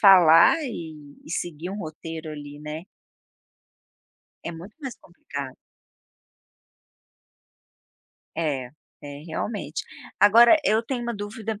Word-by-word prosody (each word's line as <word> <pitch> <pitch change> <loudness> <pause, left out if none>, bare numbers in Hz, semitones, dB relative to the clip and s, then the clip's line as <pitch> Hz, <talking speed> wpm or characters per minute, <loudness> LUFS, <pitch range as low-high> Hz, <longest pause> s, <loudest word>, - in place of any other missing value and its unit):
falar 175 - +8
e 155 - -7
e - - -11
seguir 175 0 -4
um 200 - -5
roteiro 160 -2 -6
ali, 145 -1 -8
né. 150 +3 -6 1.6
É - - -3
muito 175 +6 -11
mais 265 -4 -6
complicado. 140 -6 -8 2.8
É, 140 -6 -1 0.3
é, 145 0 -8
realmente. 205 +6 -3 0.4
Agora 230 +7 +8
eu 215 +3 +3
tenho 245 +1 -3
uma 235 0 -3
dúvida, 210 +1 -5
170 Hz, 105 wpm, -25 LUFS, 150-210 Hz, 2.8 s, falar